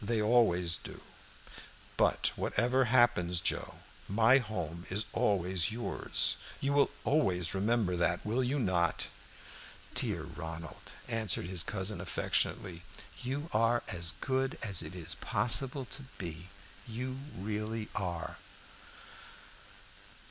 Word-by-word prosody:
"They 110 +2 0
always 105 -7 +3
do. - - -9 1.0
But - - +2
whatever 125 +4 +1
happens, 110 -8 +3
Joe, - - -3 0.3
my 115 +6 +5
home 90 -8 -5
is 105 +3 -2
always 95 -3 +1
yours. 120 +2 0 0.2
You 140 +1 0
will 145 0 +4
always 90 - +1
remember 100 -1 +1
that, 85 0 0
will 115 +5 +1
you 130 +4 0
not?" 95 -8 +1 0.9
"Dear - - +1
Ronald," 80 0 -8
answered 110 -7 0
his 90 -1 +1
cousin 105 0 -2
affectionately, 90 -4 -1 0.4
"you 135 +5 -3
are 115 +2 +3
as 85 -1 -1
good 135 0 0
as 100 -6 +2
it 90 - -7
is 85 -1 -2
possible 125 +5 +4
to 135 - -4 0.2
be 85 0 -6 0.4
you 130 +3 -4 0.2
really 105 +3 -3
are." 90 -4 -4
105 Hz, 115 wpm, -32 LUFS, 90-120 Hz, 1.0 s, my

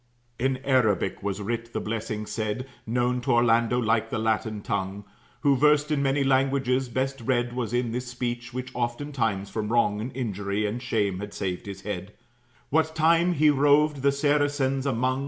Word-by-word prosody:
'" 120 - -41
In 130 +1 +1
Arabic 110 -8 +2
was 100 0 -3
writ 115 +2 -4
the - - -1
blessing 110 -1 -3
said, 110 +4 -3 0.2
Known 125 +2 0
to 130 +1 +1
Orlando 120 0 +3
like 115 -2 +1
the - - -2
Latin 110 -1 -1
tongue, 95 +2 -3 0.4
Who, 140 -2 +4
versed 150 +2 +3
in 145 -2 +1
many 140 0 +2
languages, 135 -1 +1
best 130 +2 -2
read 120 0 0
Was 120 -3 -3
in 120 -1 0
this 125 +2 -3
speech; 120 -1 -4
which 130 0 -5
oftentimes 120 -5 -2
from 110 -1 -2
wrong 105 -3 +2
And 125 +4 -4
injury 100 -3 -2
and 110 +4 -3
shame 105 -6 0
had 105 +1 -7
saved 95 -1 -3
his 100 -1 -7
head, 100 -1 -5 0.6
What 160 +1 +2
time 165 +2 +4
he 155 -1 +4
roved 145 +1 +4
the 140 +1 +2
Saracens 145 -1 +1
among. 130 +1 0
120 Hz, 175 wpm, -26 LUFS, 110-135 Hz, 0.6 s, Who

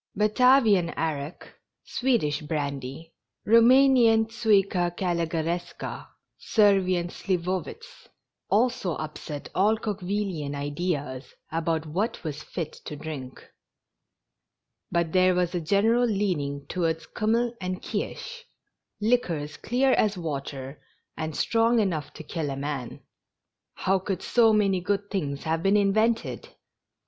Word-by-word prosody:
Batavian 215 -3 +4
arrack, 155 -1 -3 0.4
Swedish 225 - 0
brandy, 145 0 -4 0.3
Roumanian 230 0 +6
tuica 200 -5 +2
calugaresca, 170 -1 -2 0.3
Servian 190 -5 +3
sliwowitz, 185 - -4 0.4
also 210 -6 +1
upset 155 -1 -6
all 210 +4 +3
Coque 210 -3 -4
villi 195 -3 -2
an 145 0 -4
ideas 145 -2 -3 0.2
about 160 0 -1
what 185 +9 -2
was 150 -2 -5
fit 165 0 -5
to 150 - -5
drink; 140 -4 -8 1.4
but 170 -2 0
there 185 0 +4
was 180 0 0
a 175 - -1
general 220 +8 +3
leaning 160 -10 -1
towards 165 0 -1
kiimmel 230 +2 0
and 185 0 -4
kirsch, 480 -1 -5 0.5
liquors 180 -10 0
clear 260 +3 +1
as 210 -5 +2
water 140 -4 -5 0.3
and 155 -1 -4
strong 230 +5 +2
enough 175 -8 -1
to 160 - -9
kill 155 -1 -3
a 135 - -4
man. 140 -3 -4 0.7
How 190 0 +1
could 190 0 -4
so 230 -2 +4
many 200 -4 +2
good 200 +2 -2
things 145 -8 -2
have 160 0 -1
been 195 +3 +3
invented 215 +3 +1
180 Hz, 115 wpm, -26 LUFS, 155-215 Hz, 1.4 s, Roumanian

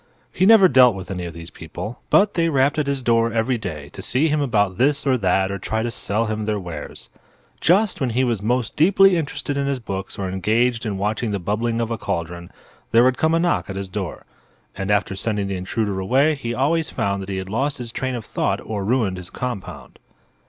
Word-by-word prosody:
He 185 - +2
never 220 -4 +8
dealt 125 - +6
with 95 0 -7
any 90 -2 -4
of 85 -1 -7
these 85 0 -9
people; 90 +8 -8
but 205 0 +4
they 165 -1 +1
rapped 140 +1 +2
at 150 - 0
his 140 -2 -1
door 115 -1 +2
every 115 +2 0
day 75 -8 -6
to - - -10
see 145 +6 +1
him 150 0 +1
about 105 -8 +1
this 140 +3 +2
or 135 -2 +3
that 95 -3 +1
or 100 - -4
to - - -16
try 110 +1 -1
to 120 - -2
sell 110 +1 -1
him 110 -1 -3
their 105 -1 -1
wares. 90 -4 -8 0.5
Just 190 +1 +2
when 130 - +1
he 125 +3 +1
was 120 -5 0
most 120 +1 -1
deeply 195 +3 +5
interested 145 -3 -3
in 140 0 0
his 140 -1 0
books 95 -4 -6
or 95 - -3
engaged 115 +6 0
in 100 -2 -2
watching 105 +3 -1
the 100 - -1
bubbling 110 +5 -1
of 115 0 -2
a 115 - -3
cauldron 85 +1 -4 0.4
there 115 +1 +5
would 130 0 +2
come 160 +1 +3
a - - +2
knock 175 -8 0
at 95 - -5
his 95 -1 -5
door. 95 -3 -5 0.5
And 95 0 -4
after 105 -1 +1
sending 105 0 -1
the 100 0 -3
intruder 100 +2 -2
away 135 +11 +3
he 125 -5 -4
always 155 +5 +1
found 100 -1 -2
he 95 - -3
had 95 0 -5
lost 135 +8 -1
his 120 -3 -6
train 130 +1 -3
of 115 - -6
thought - - -1
or 105 -2 -4
ruined 105 -4 0
his 90 0 -8
compound. 125 -6 -6
115 Hz, 230 wpm, -22 LUFS, 95-135 Hz, 0.5 s, never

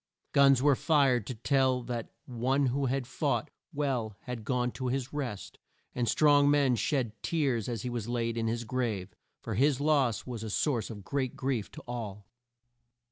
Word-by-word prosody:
Guns 135 -2 +5
were 145 -1 +5
fired 135 -7 +2
to 125 - -4
tell 130 +1 +2
that 120 -2 -4 0.2
one 130 +3 0
who 140 0 0
had 130 0 -1
fought 145 +3 -1 0.2
well 130 - -1
had 125 -3 -6
gone 125 +1 0
to 130 +2 -4
his 130 +1 -2
rest, 125 -9 -5 0.3
and 120 -2 0
strong 145 +1 +5
men 140 -3 +4
shed 120 +1 0
tears 135 -9 0
as 115 -4 -3
he 125 - -2
was 120 -2 -4
laid 115 -1 -1
in 115 -1 -1
his 115 +1 -1
grave, 110 -6 -2 0.3
for 110 - -4
his 135 +5 +3
loss 140 -7 +2
was 120 -4 -5
a 110 - -5
source 120 +1 0
of 105 -3 -8
great 130 +2 -2
grief 130 -6 -2
to - - -10
all. 105 -5 -5
125 Hz, 180 wpm, -30 LUFS, 115-140 Hz, 0.3 s, Guns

